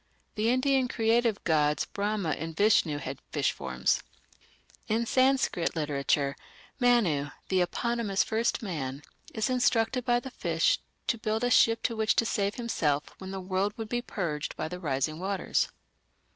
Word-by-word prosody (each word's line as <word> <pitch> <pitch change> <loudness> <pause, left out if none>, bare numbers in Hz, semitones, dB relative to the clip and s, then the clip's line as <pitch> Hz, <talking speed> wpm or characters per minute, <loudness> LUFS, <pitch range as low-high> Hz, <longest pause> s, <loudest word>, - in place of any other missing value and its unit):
The 220 +1 +1
Indian 260 +1 +2
creative 230 -2 +1
gods 150 -3 +2
Brahma 200 -4 -2
and 160 +1 -4
Vishnu 200 -8 +3
had 135 -1 -6
fish - - +1
forms. 65 0 0 0.9
In 225 +2 +1
Sanskrit 260 -10 +2
literature 140 -2 0 0.4
Manu, 205 - +3 0.2
the 185 -1 +3
eponymous 225 +1 0
"first 225 +1 0
man", 145 -7 -4 0.3
is 220 -1 +1
instructed 250 -1 +2
by 240 0 +2
the 265 +2 -8
fish - - +1 0.3
to 230 - 0
build 220 +1 -1
a 245 - +1
ship 225 -1 +4
in 230 - -5
which 220 0 +2
to 230 - +3
save 205 -2 0
himself 160 - -1
when 190 - -7
the 195 0 -4
world 190 +3 -1
would 220 -2 -5
be 240 +1 -1
purged 165 -10 -4
by - - -2
the 180 +2 -6
rising 155 -1 -1
waters. 195 +1 0
205 Hz, 155 wpm, -29 LUFS, 155-235 Hz, 0.9 s, ship